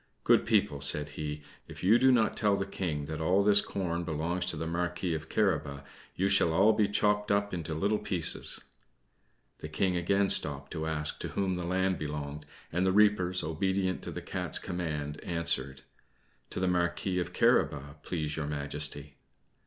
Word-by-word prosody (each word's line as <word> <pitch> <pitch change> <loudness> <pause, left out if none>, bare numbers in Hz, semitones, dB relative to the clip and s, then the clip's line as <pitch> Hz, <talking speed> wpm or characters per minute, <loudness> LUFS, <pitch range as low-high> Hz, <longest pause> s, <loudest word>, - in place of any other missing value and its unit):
"Good - - +4
people," 70 -1 +2
said 75 +2 -1
he, 75 0 -5 0.2
"if - - -11
you 110 +6 +5
do 130 0 +5
not 115 -3 +2
tell 105 -2 +2
the 100 0 -2
King 80 -7 -3
that 80 +1 -5
all 95 +5 +3
this 105 0 +5
corn 85 -3 -3
belongs 85 +2 -2
to 85 - 0
the 80 - -3
Marquis 85 +1 -2
of 80 0 -5
Carabas, 75 -9 0 0.3
you 95 - +1
shall 95 -4 +3
all 100 +6 +5
be 105 -1 +2
chopped 105 0 +1
up 100 0 +1
into 80 -3 -4
little 100 +6 +1
pieces." 85 -5 +1 1.0
The 75 - -7
King 90 +4 0
again 100 +3 +1
stopped 70 -2 +1
to 80 -2 -3
ask 75 -1 -2
to - - -4
whom 95 -2 -1
the 90 -1 -4
land 95 +1 0
belonged, 75 -1 -5 0.2
and 90 +3 0
the 95 - +3
reapers, 95 -3 +3
obedient 95 +4 -1
to - - -5
the - - -6
Cat's - - -1
command, 75 -4 -4
answered 70 -6 -1 0.7
"To - - -4
the 95 - +1
Marquis 90 +1 0
of 90 - -3
Carabas, 70 +1 +1
please 75 -2 -3
Your 75 -2 -2
Majesty." 75 0 -3
85 Hz, 175 wpm, -30 LUFS, 75-95 Hz, 1.0 s, you